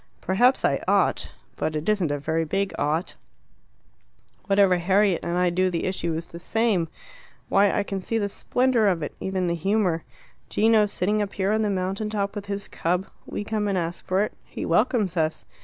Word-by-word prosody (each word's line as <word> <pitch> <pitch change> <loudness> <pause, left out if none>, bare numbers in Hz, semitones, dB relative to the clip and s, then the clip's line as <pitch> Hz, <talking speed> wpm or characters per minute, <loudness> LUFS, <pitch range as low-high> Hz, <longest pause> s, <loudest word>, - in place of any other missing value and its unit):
"Perhaps 245 +8 +3
I - - +1
ought. - - +2 0.3
But 155 - -2
it 150 +1 -3
isn't 205 -7 +2
a 145 - -1
very 160 +3 -1
big 195 +5 -1
'ought.' 155 +4 0 1.3
Whatever 195 -3 +4
Harriet 190 +1 +3
and 170 +1 -2
I 180 -1 +2
do 185 +1 +2
the 170 -2 -2
issue 170 -3 -1
is 165 +1 -3
the 170 - -10
same. 215 -3 +1 0.6
Why, 200 0 +4
I 205 - 0
can 195 -1 -4
see 225 +5 -1
the 205 -2 0
splendour 245 +2 +1
of 175 -5 +1
it - - -4
even 190 -1 -1
the 170 - 0
humour. 180 -1 +1 0.5
Gino 220 -1 +4
sitting 205 +2 0
up 205 -1 -3
here 195 +1 0
on 220 +1 +2
the 210 - +1
mountain 195 +2 -2
top 200 -2 -2
with 205 -1 -6
his 200 0 -4
cub. 180 +3 -1 0.2
We - - -4
come 210 -1 -1
and 195 -2 0
ask 170 -1 -3
for 190 +2 +1
it. 215 - -4
He - - -6
welcomes 205 0 +1
us. 160 -1 0
195 Hz, 195 wpm, -25 LUFS, 170-210 Hz, 1.3 s, Whatever